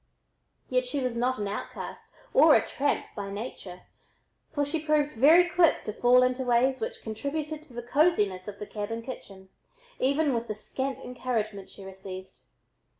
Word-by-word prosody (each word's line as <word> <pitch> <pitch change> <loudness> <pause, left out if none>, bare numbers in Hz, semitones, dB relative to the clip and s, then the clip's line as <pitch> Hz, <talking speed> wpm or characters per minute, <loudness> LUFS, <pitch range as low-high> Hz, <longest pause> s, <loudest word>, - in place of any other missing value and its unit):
Yet 255 0 +1
she 280 +3 -2
was 250 -3 -1
not 250 +2 +1
an 205 - -2
outcast 200 - -6 0.2
or - - +7
a - - +3
tramp 285 +1 0
by 200 -2 -4
nature, 200 -3 -7 0.7
for 290 -2 0
she 310 +2 -3
proved 300 -1 +2
very 315 +9 +6
quick 345 -3 +3
to 215 - -4
fall 250 +3 +5
into 255 +1 +1
ways 250 +2 +2
which 470 +1 -4
contributed 295 +7 -4
to 270 - -16
the 240 0 -5
cosiness 235 - +2
of 205 -1 -6
the 210 - -6
cabin 220 +2 -5
kitchen, 195 -6 -9 0.5
even 280 +2 +2
with 235 0 -2
the 215 - -3
scant 265 +5 -4
encouragement 220 -5 -3
she 195 - -12
received. 190 0 -9
250 Hz, 165 wpm, -28 LUFS, 210-285 Hz, 0.7 s, or